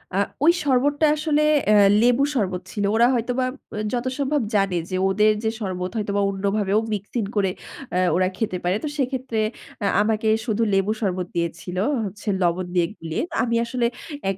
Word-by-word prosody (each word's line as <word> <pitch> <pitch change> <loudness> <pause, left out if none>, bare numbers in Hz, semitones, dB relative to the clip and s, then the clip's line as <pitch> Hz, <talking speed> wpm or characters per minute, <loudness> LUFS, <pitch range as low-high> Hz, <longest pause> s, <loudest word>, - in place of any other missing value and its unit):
আ - - +1 0.3
ওই 340 - +8
শরবতটা 285 +3 +2
আসলে 305 -1 +1 0.3
অ্যা 215 - +5 0.3
লেবু 245 +3 +4
শরবত 185 -5 -1
ছিল। 205 - -3
ওরা 235 +2 +5
হয়তোবা 245 +2 0 0.3
অ - - -4 0.2
যথা 250 +1 -1
সম্ভব 280 0 +1
জানে 195 -3 +2
যে 185 - -2
ওদের 210 +2 +4
যে 220 - +2
শরবত 185 -2 -3
হয়তো 205 -1 -2
বা - - +2
অন্যভাবেও 200 +1 0
মিক্সিং 205 +3 -3
করে 195 -2 +2 0.4
অ্যা 180 - 0 0.2
ওরা 185 0 +2
খেতে 205 -5 -1
পারে। 180 +2 +1
তো - - -1
সেক্ষেত্রে 260 -4 -2 0.4
অ্যা 200 - +1
আমাকে 220 0 0 0.2
শুধু 225 -1 -1
লেবু 195 +2 +2
শরবত 185 -3 -1
দিয়েছিল 170 +2 -3 0.3
হচ্ছে 205 +3 -9
লবণ 175 +1 +1
দিয়ে 170 -1 +3
গুলিয়ে। 160 -1 -3
তো - - -5
আমি 235 -1 0
আসলে 240 0 -1 0.4
এক 195 - -2
210 Hz, 180 wpm, -23 LUFS, 185-245 Hz, 0.4 s, ওই